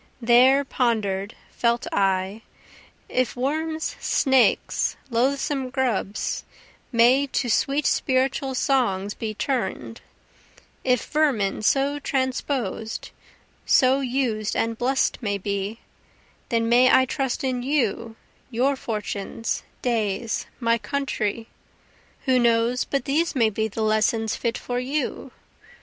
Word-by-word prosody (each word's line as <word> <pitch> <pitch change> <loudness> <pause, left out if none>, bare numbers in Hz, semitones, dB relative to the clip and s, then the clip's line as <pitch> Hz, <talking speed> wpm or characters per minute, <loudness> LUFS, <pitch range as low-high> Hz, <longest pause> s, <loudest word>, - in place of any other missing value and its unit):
There 255 +4 +5
ponder'd, 215 -6 -1 0.2
felt 235 0 0
I, 195 +2 0 0.7
If 255 -2 0
worms, 315 +5 -2
snakes, 265 -3 +2
loathsome 265 +2 0
grubs, 250 -6 -1 0.5
may 250 +4 +4
to 250 -2 -1
sweet 275 +5 +1
spiritual 265 +1 +1
songs 210 -8 +1
be 215 -1 -5
turn'd, 190 - -3 0.8
If 250 -2 +1
vermin 260 -12 +1
so 275 +5 +2
transposed, 260 -5 -2 0.6
so 260 +1 +4
used 245 -5 -1
and 230 0 0
bless'd 260 +4 0
may 205 -3 -1
be, 200 +2 -3 0.7
Then 230 -1 +1
may 245 +2 +5
I 260 - +6
trust 265 0 -2
in 255 -2 -1
you, 235 -4 -1 0.3
your 260 +3 +1
fortunes, 215 -2 -4 0.2
days, 225 -2 -1
my 230 -1 +2
country; 230 -5 -2 0.8
Who 260 -2 +3
knows 235 +1 +2
but 275 - -2
these 310 +4 0
may 225 -4 +3
be 220 +1 -1
the 220 +1 -4
lessons 220 +1 +1
fit 235 -1 -2
for 245 0 -3
you? 275 +4 -3
245 Hz, 110 wpm, -24 LUFS, 220-265 Hz, 0.8 s, I